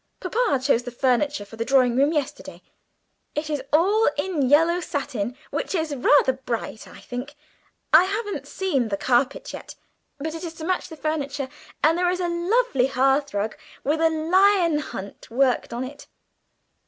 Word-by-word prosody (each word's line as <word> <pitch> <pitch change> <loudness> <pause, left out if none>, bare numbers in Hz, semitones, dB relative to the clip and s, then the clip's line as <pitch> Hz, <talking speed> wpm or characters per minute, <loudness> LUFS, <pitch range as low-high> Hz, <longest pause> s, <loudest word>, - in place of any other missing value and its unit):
Papa 420 - +1
chose 260 -3 +3
the 245 - -6
furniture 255 -1 0
for 225 +3 -13
the 230 - -1
drawing 255 -1 +3
room 280 +4 +3
yesterday. 295 -4 -4 0.7
It 305 +1 -2
is 295 -3 -1
all 395 +8 +4
in 290 -5 0
yellow 330 +4 +4
satin, 265 - -3
which - - -2
is 320 -4 -1
rather 265 0 +4
bright, 240 -4 -5
I - - -13
think. 255 +4 -7 0.6
I 360 - +8
haven't 410 +2 -3
seen 285 -11 -1
the 200 -2 -2
carpet 255 +4 0
yet, - - -9 0.4
but 310 +3 -4
it 325 +1 -7
is 330 -1 -6
to 320 - -7
match 370 +1 -1
the 320 - -10
furniture; 285 -3 -2 0.3
and 325 +3 +4
there 360 0 +2
is 360 0 -1
a 355 - 0
lovely 345 - +1
hearthrug, 265 -5 +1 0.3
with 305 +3 0
a 325 - +5
lion 340 +1 +3
hunt 200 -8 -8
worked 255 +2 +1
on 240 +2 -3
it. 280 +3 -9
290 Hz, 165 wpm, -24 LUFS, 255-340 Hz, 0.7 s, I